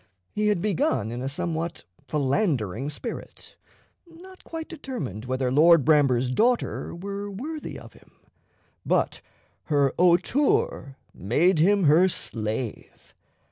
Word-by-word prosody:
He 210 0 0
had 205 -5 +1
begun 130 - 0
in 120 +1 -5
a 135 - -2
somewhat 170 +2 -3 0.2
philandering 135 - 0
spirit, 145 - -8 0.5
not 365 +3 -15
quite 325 -1 -7
determined 245 - -6
whether 130 0 -1
Lord 160 +2 +5
Bramber's 135 -5 +3
daughter 235 - 0
were 200 +3 -5
worthy 295 +11 -6
of - - -13
him; - - -21 0.7
but - - 0 0.4
her 140 -3 +2
hauteur 180 - +2 0.2
made 155 - +2
him 200 +4 +4
her 165 +5 +5
slave. 110 - -4
165 Hz, 115 wpm, -25 LUFS, 130-205 Hz, 0.7 s, Lord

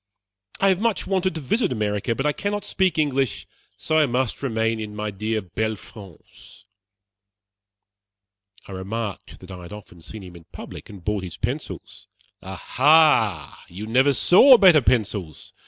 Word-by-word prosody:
I 195 - +3
have 185 -1 +1
much 230 -2 0
wanted 185 -2 -1
to 160 - -4
visit 180 - 0
America; 105 0 -2
but 135 - -3
I 150 - +3
cannot 205 +3 -3
speak 190 -4 0
English, 135 -5 -1 0.3
so 155 0 0
I 150 - +3
must 125 -1 -2
remain 115 -3 -1
in 105 -1 -7
my 105 0 -4
dear 110 +2 -3
belle 110 +4 -3
France." 100 -5 -15 2.0
I - - -11
remarked 100 +3 -6
that 95 0 -12
I 90 -1 -9
had 85 - -12
often 105 -5 -12
seen 105 +5 -9
him 90 -1 -12
in 85 -1 -14
public, - - -11
and 95 -5 -13
bought 105 -1 -1
his 90 - -8
pencils. - - -6 0.3
"Aha! 110 - +2
you 95 +5 -8
never 130 +5 +3
saw 240 - +6
better 180 -8 +6
pencils. 105 - -2
110 Hz, 155 wpm, -22 LUFS, 100-150 Hz, 2.0 s, saw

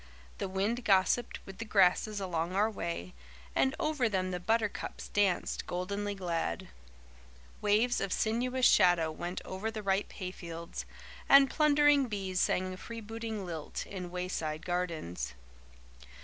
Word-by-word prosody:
The - - -2
wind 205 +6 -1
gossiped 200 +4 +2
with 195 +1 -10
the - - -2
grasses 205 +1 +3
along 175 -2 -2
our 210 +3 +3
way, 170 - -4 0.4
and 265 - +2
over 295 -7 +1
them 185 -2 -1
the 180 - -2
buttercups 220 +3 -1
danced, 200 -4 +1
goldenly 200 +3 -2
glad. 170 - -2 0.9
Waves 220 +4 +3
of 195 - -2
sinuous 250 +5 +1
shadow 170 -3 +5
went 175 +3 -5
over 190 +4 -3
the 220 -1 -6
ripe 195 +1 0
hayfields, 170 -3 -6 0.4
and 275 -1 +8
plundering 290 -2 +4
bees 195 -4 -2
sang 185 0 +1
a - - -8
freebooting 225 -1 -6
lilt 165 -4 -5
in 180 -3 -6
wayside 175 -4 -3
gardens. 170 - -3
195 Hz, 135 wpm, -31 LUFS, 180-225 Hz, 0.9 s, and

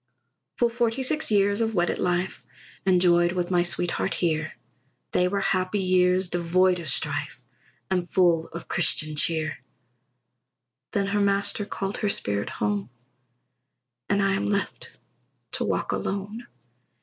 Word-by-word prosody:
Full 240 - +3
forty 240 +2 0
six 305 +4 -1
years 205 0 +2
of 225 -1 0
wedded 175 -1 +1
life, 180 +1 -1 0.4
Enjoyed 175 -2 +4
with 180 0 -2
my 175 -1 +4
sweetheart 175 +1 -1
here; 155 -3 -1 0.6
They 180 - +2
were 200 +2 -1
happy 185 +1 0
years, 185 0 +3
devoid 180 +1 +2
of 170 - -7
strife, 145 0 -2 0.5
And 180 -2 0
full 170 -3 +3
of 170 +1 -9
Christian 155 -3 +1
cheer; 155 0 0 1.3
Then 200 -1 0
her 205 +1 0
Master 200 +1 0
called 195 0 -4
her 210 - 0
spirit 100 - 0
home, 105 0 -2 1.2
And 200 0 +2
I 195 0 +2
am 195 - -1
left 200 -1 -2 0.6
to - - 0
walk - - -1
alone. 205 +5 -4
185 Hz, 135 wpm, -25 LUFS, 170-200 Hz, 1.3 s, Enjoyed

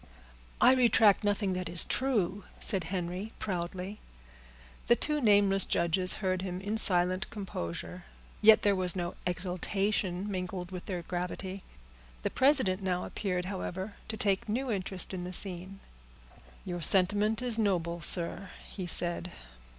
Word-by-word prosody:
"I 255 - +6
retract 230 -5 +4
nothing 205 -1 0
that 185 0 -4
is 170 - +5
true," 205 -7 -1 0.2
said 195 -5 +1
Henry 180 +4 -5
proudly. 185 +1 -5 0.9
The 240 - +5
two 300 +3 0
nameless 200 -4 +4
judges 175 +2 +1
heard 185 -1 0
him 185 -1 -5
in 205 +3 -3
silent 185 -1 +6
composure, 180 - -7 0.4
yet 220 0 +6
there 205 -1 +3
was 185 -1 +1
no 175 -1 -3
exultation 185 +1 -2
mingled 180 -2 -5
with 180 -1 -8
their 180 -3 -4
gravity. 185 +2 -5 0.6
The - - -2
president 260 -9 +2
now 180 -1 -2
appeared, 180 -3 -3
however, 190 +1 -5
to 220 - -5
take 200 0 -1
new 250 +4 -2
interest 190 -2 -2
in 180 -1 -5
the 180 - -6
scene. 190 +1 +4 0.9
"Your 175 -1 -5
sentiment 205 +5 +2
is 235 -2 +2
noble, 170 -5 -1
sir," 175 +4 -1 0.2
he 185 -3 -7
said. 175 +1 0
190 Hz, 140 wpm, -29 LUFS, 180-205 Hz, 0.9 s, I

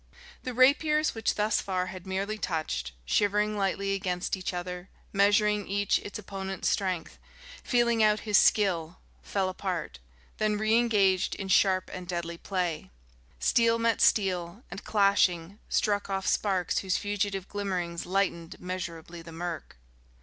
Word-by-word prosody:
The 255 -2 -5
rapiers 300 +4 +4
which 225 -1 -1
thus 210 0 +1
far 185 -2 -1
had 185 0 -10
merely 200 +3 -2
touched, 155 - -2
shivering 210 - +1
lightly 195 0 0
against 185 -2 -2
each 185 -1 -4
other, 180 0 -6 0.2
measuring 205 +1 +3
each 200 +1 +1
its 205 - -7
opponent's 195 -2 -4
strength, 185 -5 -2 0.4
feeling 235 -2 +2
out 215 0 +4
his 210 -3 +4
skill, 180 -5 +2 0.2
fell 195 -2 -1
apart, 185 - -4 0.4
then 215 -1 +1
re 215 +1 +1
engaged 205 -6 +3
in 195 -1 -6
sharp 190 0 +3
and 180 -1 -7
deadly 170 -1 -4
play. 180 -5 -2 0.5
Steel 230 - +3
met 230 -1 +1
steel 185 +1 +2
and, 195 +2 -7
clashing, 200 -2 +2
struck 205 -2 0
off 195 -1 -2
sparks 190 -4 +1
whose 190 -1 0
fugitive 200 -2 -2
glimmerings 180 -5 -3
lightened 180 -3 -1
measurably 175 -2 -6
the 165 0 -11
murk.... 165 - -6
195 Hz, 140 wpm, -28 LUFS, 180-210 Hz, 0.5 s, rapiers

